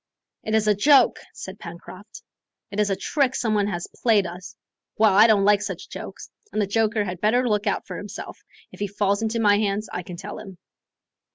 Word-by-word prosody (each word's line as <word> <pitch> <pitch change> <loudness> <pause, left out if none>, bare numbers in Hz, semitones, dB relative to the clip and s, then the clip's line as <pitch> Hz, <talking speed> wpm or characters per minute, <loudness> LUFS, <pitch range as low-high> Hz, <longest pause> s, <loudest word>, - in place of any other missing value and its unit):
"It 220 - -1
is 220 -1 +2
a 210 - +5
joke," 260 +5 +4
said 190 +2 -9
Pencroft; 185 +4 -11 0.5
"it 200 - -4
is 210 -1 +2
a 195 - +1
trick 270 +4 0
some 220 -3 0
one 205 -1 +1
has 175 -4 -4
played 215 -5 +4
us. 180 +2 -8 0.4
Well, 215 -2 +5
I 210 +4 +7
don't 205 -3 +4
like 205 0 +4
such 210 - -6
jokes, - - -9 0.2
and - - -2
the 210 - +2
joker 215 +1 +1
had 180 -1 -6
better 245 +4 +2
look 210 -1 0
out 200 - -1
for - - -7
himself, 205 - -8 0.3
if - - -14
he 205 - -1
falls 200 +1 0
into 225 +1 -1
my 205 -2 +4
hands, 210 0 -1
I 180 - -3
can 175 0 -9
tell 205 +3 -7
him." 190 -3 -11
205 Hz, 210 wpm, -24 LUFS, 195-220 Hz, 0.5 s, I